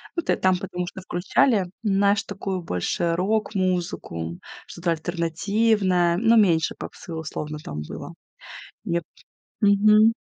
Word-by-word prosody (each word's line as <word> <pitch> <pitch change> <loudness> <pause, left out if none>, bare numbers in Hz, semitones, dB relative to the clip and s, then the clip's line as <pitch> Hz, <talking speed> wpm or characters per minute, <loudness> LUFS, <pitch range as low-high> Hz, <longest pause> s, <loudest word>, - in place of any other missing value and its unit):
Ну 340 - 0
тэ - - +2
там 185 -1 +3
потому 180 -1 -4
что 190 - -8
включали, 185 +4 +2 0.2
знаешь, 200 0 +2
такую, 195 -2 -4
больше 165 - -1
рок-музыку, 180 - -1 0.3
что-то 170 0 -2
альтернативное, 175 +2 +1
но 230 +3 +4
меньше 175 -8 +3
попсы 170 - -8
условно 155 -1 -5
там 75 0 -5
было, - - -8 0.7
мне 170 0 -1
п 165 - -26 0.6
Мгм. 210 +2 +6
185 Hz, 125 wpm, -24 LUFS, 170-205 Hz, 0.7 s, Мгм